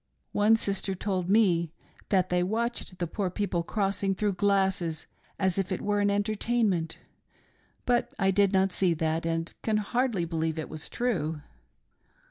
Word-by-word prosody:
One 210 +2 +4
sister 195 -3 -1
told 185 -2 -2
me 185 -6 +3 0.4
that 185 -2 +2
they 180 0 +2
watched 220 0 -2
the 175 - -1
poor 185 +3 -2
people 180 -2 -1
crossing, 195 +1 -1
through 205 0 0
glasses, 190 -4 +1 0.3
as 190 -1 +1
if 195 0 -2
it 185 - -1
were 205 0 0
an 205 0 +3
entertainment, 205 -4 0 0.9
but 245 -1 +1
I 195 -1 +3
did 200 0 +3
not 190 -1 +2
see 180 -3 +3
that, 160 +1 -1
and 165 0 -2
can 220 -1 +1
hardly 215 -3 0
believe 160 -1 -2
it 155 - -4
was 155 -1 -6
true. 160 -11 -1
195 Hz, 155 wpm, -28 LUFS, 170-205 Hz, 0.9 s, One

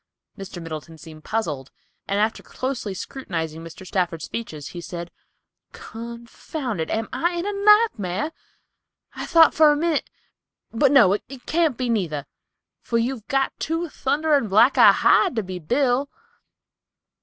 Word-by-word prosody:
Mr. 195 -2 -8
Middleton 165 0 -8
seemed 155 -1 -13
puzzled, 155 - -3 0.4
and 200 +1 0
after 220 +2 0
closely 255 -7 -4
scrutinizing 165 - -5
Mr. 165 +3 -11
Stafford's 175 -4 -2
features, 155 -11 -6
he 175 - -8
said, 170 0 -7 0.6
"Confound 235 - -6
it, 160 - -3
am 220 0 -1
I 345 +1 0
in 345 +1 -3
a 410 - -2
nightmare? 400 - +3 0.8
I - - -6
thought 330 -2 +6
for 310 -1 +6
a - - +2
minute—but 295 -4 -2
no, 235 -10 +6
it 245 +5 -6
can't 320 -6 +1
be 255 - -2
neither, 170 -11 -1 0.6
for 230 - -1
you've 230 -1 -2
got 270 -2 +1
too 330 +2 -2
thunderin' 290 -2 +1
black 220 +7 +5
a - - +8
hide 370 -9 +3
to 220 - 0
be 185 -1 -6
Bill." 255 - +1
230 Hz, 145 wpm, -23 LUFS, 175-285 Hz, 0.8 s, a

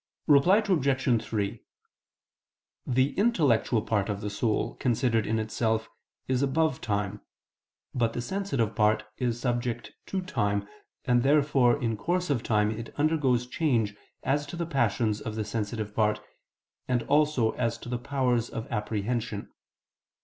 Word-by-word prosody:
Reply 180 +9 +5
Obj. 135 - +2
3: 105 -3 -3 1.2
The 130 +2 +2
intellectual 145 - +2
part 105 -2 0
of 100 -1 -3
the 105 - -3
soul, 105 +2 0
considered 115 -2 +1
in 110 - +1
itself, 110 0 -1 0.4
is 130 0 +1
above 150 +1 +1
time, 100 -1 -2 0.7
but 115 -2 +1
the - - -3
sensitive 140 - -1
part 110 0 +3 0.2
is 120 -2 -1
subject 120 -1 -2
to 190 -1 -2
time, 100 - -1 0.4
and 120 -1 +3
therefore 140 -2 +3
in 115 -4 -1
course 175 - -1
of 125 -5 +1
time 105 -2 +2
it 115 +1 -6
undergoes 145 -5 +2
change 120 -7 0 0.3
as 145 +2 0
to 160 - -7
the 170 0 -2
passions 115 -7 0
of 110 - -5
the 110 -1 -2
sensitive 105 0 -3
part, 105 -1 +2 0.7
and 125 -2 +1
also 145 -6 +2
as 115 -2 -1
to 115 - -11
the 120 0 -2
powers 125 -3 0
of 115 0 -5
apprehension. 110 0 -2
120 Hz, 140 wpm, -28 LUFS, 110-140 Hz, 1.2 s, Reply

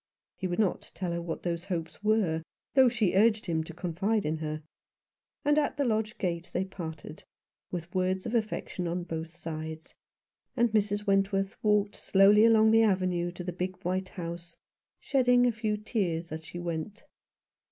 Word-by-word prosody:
He 185 - -3
would 175 - -2
not 210 -4 0
tell 180 -2 -3
her 170 0 -2
what 170 -1 -5
those 170 0 -2
hopes 170 -1 -4
were, 210 -7 +2 0.3
though 265 -2 +6
she 220 -6 +1
urged 215 +2 +4
him 160 -2 0
to 165 - -8
confide 190 +5 -1
in 155 +1 0
her; 155 0 -4 0.8
and 295 +1 +4
at 295 0 -1
the 285 - +1
lodge 220 -2 0
gate 175 -2 -2
they 190 - 0
parted, 160 -4 -8 0.5
with 175 -1 -6
words 185 0 0
of 230 - -3
affection 215 -5 -2
on 175 +1 -2
both 160 -1 -5
sides, 160 -1 -7 0.6
and 240 -1 +3
Mrs. 205 -1 +1
Wentworth 195 0 +1
walked 210 -1 +2
slowly 205 +2 +5
along 220 -1 +6
the 225 0 +6
avenue 185 -4 +1
to 180 - -7
the 180 0 -4
big 185 +2 -3
white 185 +1 -1
house, 170 -1 -7 0.4
shedding 250 -2 +3
a 245 - +4
few 220 -1 -1
tears 175 -7 -2
as 160 +1 -5
she 175 +2 -9
went. 175 - -4
185 Hz, 175 wpm, -29 LUFS, 170-215 Hz, 0.8 s, though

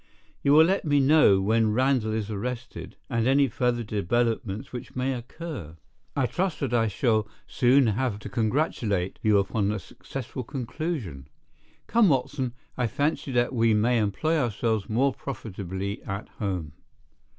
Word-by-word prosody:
You 140 - +3
will 160 +2 +8
let 190 +3 +1
me 145 -2 +3
know 135 -8 +5
when 110 +2 +2
Randall 130 -2 +2
is 110 -1 -2
arrested, 120 +4 -5
and 115 -2 0
any 135 +1 +4
further 120 0 0
developments 110 +1 -1
which 125 - -7
may 130 +1 0
occur. 125 - -7 0.4
I 140 - +2
trust 175 - -1
that 135 -4 -1
I 115 -2 +3
shall 110 0 +1 0.2
soon 130 +2 +4
have 115 0 0
to - - -7
congratulate 110 - -1
you 105 -2 +4
upon 100 +1 +1
a 105 - -1
successful 130 +6 -7
conclusion. 125 - -4 0.6
Come, 230 -4 +4
Watson, 130 -2 -1 0.2
I 125 -2 0
fancy 145 +3 -1
that 120 +1 +2
we 115 -2 +3
may 115 +3 +3
employ 135 +11 +1
ourselves 110 -4 -1
more 130 +5 +2
profitably 100 -6 -5
at 100 +1 -6
home." 90 -7 -2
120 Hz, 150 wpm, -26 LUFS, 105-135 Hz, 0.6 s, will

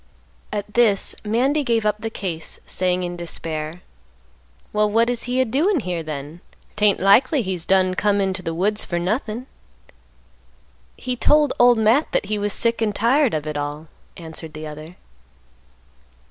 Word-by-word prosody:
At 210 0 -4
this 220 -5 +3
Mandy 260 +8 +1
gave 230 -4 0
up 210 0 +1
the 225 - -3
case, 175 -7 -5
saying 180 0 0
in 175 0 -4
despair, 165 -1 -5 0.9
"Well, 210 0 +2
what 230 +3 +2
is 240 -1 -2
he 250 +1 0
a 260 - +4
doin' 300 - +1
here 180 -4 -3
then? 155 +1 -7 0.3
'Tain't 210 -1 +3
likely 250 - +4
he's 185 -4 -4
done 185 -1 +3
come 205 +2 +1
into 190 -1 -1
th' 165 -2 -4
woods 210 +5 0
fer 175 - -3
nothin'." 215 +6 -2 1.5
"He 250 - -3
told 295 +3 +3
Old 245 -1 +6
Matt 225 +7 +2
that - - +1
he 210 +1 -2
was 205 0 -1
sick 230 +3 0
and 210 -2 0
tired 250 - +3
of 150 -1 -3
it 150 -1 -3
all," 145 +2 -5 0.3
answered 160 -1 -8
the 155 0 -7
other. 155 +3 -9
205 Hz, 160 wpm, -22 LUFS, 170-230 Hz, 1.5 s, Old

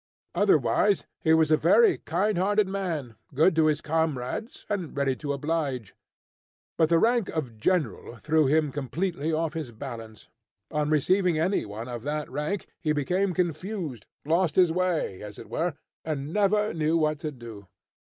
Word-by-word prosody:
Otherwise 205 -2 +3 0.2
he 160 - +3
was 160 -1 +4
a - - +7
very 450 - +4
kind 195 +6 0
hearted 205 +2 +2
man, 170 -11 -3 0.2
good 160 +4 +4
to 160 -1 +4
his 150 -1 +1
comrades, 160 - -2
and 180 -8 -3
ready 135 -2 +1
to 145 +1 -4
oblige. 140 -6 -2 0.8
But 160 -1 +3
the 170 - +5
rank 230 +2 +2
of 135 -8 -4
general 160 -4 0
threw 155 +3 +2
him 150 0 +2
completely 150 +4 -2
off 160 0 -1
his 155 -7 -5
balance. 115 -4 -9 0.4
On 150 -1 0
receiving 180 +3 +2
any 175 - +1
one 110 +4 -6
of 120 -2 -5
that 150 +2 -3
rank, 150 +8 -2
he 155 -4 0
became 180 +6 0
confused, 175 - -3 0.2
lost 165 +2 +2
his 180 -3 +5
way, 175 - -1
as 105 -1 -9
it - - -11
were, 170 -2 -1 0.3
and 150 -1 -4
never 210 +1 +2
knew 160 0 +1
what 155 -2 +1
to 155 - -4
do. 115 -7 -11
155 Hz, 160 wpm, -27 LUFS, 140-180 Hz, 0.8 s, a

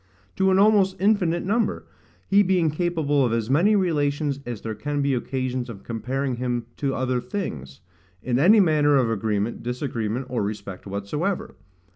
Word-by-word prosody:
to 190 0 +2
an 190 - +4
almost 200 -2 +4
infinite 185 -4 +2
number: 225 +4 0 0.4
he 200 +1 +5
being 180 -5 +2
capable 155 -4 0
of 120 - +1
as 115 +1 -1
many 185 +10 +4
relations 145 -6 0
as 120 -4 -5
there 110 - -4
can 145 +7 -3
be 140 -1 +1
occasions 130 0 -2
of 100 -4 -9
comparing 125 +3 -3
him 120 -1 -2
to 135 -2 -2
other 130 -1 -1
things, 80 - -6 0.4
in 125 0 0
any 200 +9 +6
manner 150 -5 +4
of 125 -4 +2
agreement, 105 +1 -1
disagreement, 125 -1 -3
or 125 -2 -2
respect 100 -2 -5
whatsoever. 125 - -3
135 Hz, 160 wpm, -24 LUFS, 115-175 Hz, 0.4 s, any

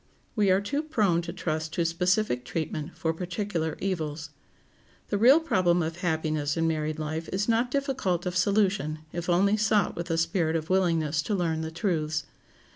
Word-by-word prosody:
We 210 -3 +3
are 190 +1 +4
too 280 +9 -1
prone 210 - +1
to 170 0 -6
trust 160 -3 -3
to 170 - 0
specific 180 - +1
treatment 155 +3 -4
for 160 0 0
particular 175 -2 -3
evils. 155 -5 -3 0.8
The 205 - 0
real 260 +8 +7
problem 180 - +2
of 160 +1 -4
happiness 155 -3 -1
in 165 - +1
married 155 -1 -1
life 155 +1 -4
is 195 +2 -1
not 230 +2 +2
difficult 255 - -1
of 180 0 -2
solution 190 -4 +1 0.2
if 175 +1 -4
only 200 +4 +3
sought 215 -2 +2
with 170 +1 -5
a 165 - +1
spirit 165 -1 +1
of 160 +2 -2
willingness 165 -5 +2
to 205 +6 -2
learn 165 -4 0
the 160 - -3
truths. 160 -3 -1
170 Hz, 175 wpm, -27 LUFS, 160-200 Hz, 0.8 s, real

